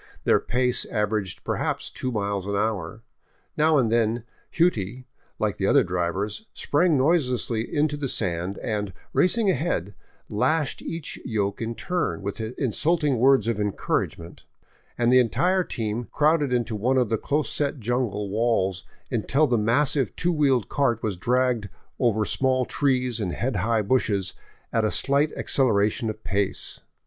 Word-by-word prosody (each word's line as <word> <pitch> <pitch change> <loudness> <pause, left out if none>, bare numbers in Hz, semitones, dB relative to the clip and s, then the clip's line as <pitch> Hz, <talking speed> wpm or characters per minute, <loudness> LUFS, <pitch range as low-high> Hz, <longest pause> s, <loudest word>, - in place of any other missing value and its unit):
Their - - +4
pace 125 0 0
averaged 105 -4 -2
perhaps - - -2
two 130 - -4
miles 100 -3 -2
an 100 - -1
hour. 105 0 -2 0.5
Now 155 0 +4
and 120 -5 +2
then 115 0 +1
" - - -37
Hughtie," 125 - +1 0.3
like - - -1
the - - 0
other - - +5
drivers, 95 - -2
sprang 155 +1 +2
noiselessly 125 -6 +1
into 150 -1 +1
the 145 -2 -2
sand 90 -4 -2
and, 105 -4 -2 0.2
racing 200 +2 +3
ahead, 130 - -1 0.3
lashed 150 +7 0
each 165 -2 -5
yoke 100 -3 -2
in 115 +1 -3
turn, 180 - -2
with 100 +3 -4
insulting 135 +5 0
words 135 -1 +4
of 115 -3 0
encourgage 105 -1 -1
ment, 85 0 -12 0.5
and 120 +1 +3
the 130 - +7
entire 180 - +2
team 115 -4 -3
crowded 150 -2 +2
into 120 -2 0
one 125 +6 +1
of 125 -4 +2
the 110 - +1
close 150 +1 -1
set 145 -1 -1
jungle 115 -3 -1
walls 100 -4 +1 0.3
until 135 +6 +2
the 125 -4 +1
massive 125 +5 +1
two 175 - 0
wheeled 135 - +2
cart 120 -5 0
was 105 -3 -1
dragged 120 +1 0 0.3
over 110 -4 +2
small 130 +1 +1
trees 125 -4 0
and 95 -5 -2
head 125 -3 -2
high 110 +3 +1
bushes 100 -5 0 0.4
at 115 - +2
a 110 - +2
slight 140 +5 +2
acceleration 110 -2 +1
of 110 0 -7
pace. 100 0 -2
120 Hz, 155 wpm, -25 LUFS, 105-140 Hz, 0.5 s, the